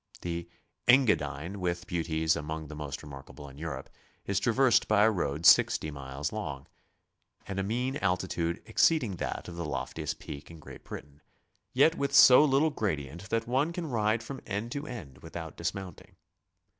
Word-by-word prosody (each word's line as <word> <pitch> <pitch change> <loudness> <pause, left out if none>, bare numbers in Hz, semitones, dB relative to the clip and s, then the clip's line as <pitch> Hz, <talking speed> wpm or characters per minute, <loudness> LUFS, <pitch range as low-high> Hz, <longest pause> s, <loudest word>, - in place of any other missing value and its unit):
The 85 0 -4 0.4
Engadine, 95 - +3
with 90 0 -2
beauties 80 -4 0
among 80 0 -5
the 75 - -7
mos't 75 0 -6
remarkable 70 0 -10
in 70 +1 -12
Europe, 80 0 -5 0.4
is 100 0 0
traversed 125 +3 +3
by 105 -1 +4
a 110 - +5
road 80 -6 -2
6o 80 -2 +5
miles 70 +1 -5
long, 70 -11 -5 0.8
at 95 -1 -4
a - - +2
mean 125 +7 -1
altitude 90 - -1
exceeding 125 - +2
that - - -4
of 85 -1 -8
the 85 - -3
lofti 75 - -4
est - - -3
peak 70 - -9
in 85 - -11
Great 75 - -12
Britain, 70 +1 -10 0.5
yet 140 +5 +5
with 140 -2 -1
so 130 +3 +9
little 150 +2 +3
gradient 85 - -3
that 115 0 0
one 135 +7 +1
can 170 -4 -5
ride 110 0 +1
from 135 +3 -7
end 105 +3 -3
to 145 +3 -4
end 75 - -8
without 80 -1 -8
dismounting. 90 +2 -6
90 Hz, 170 wpm, -29 LUFS, 80-115 Hz, 0.8 s, so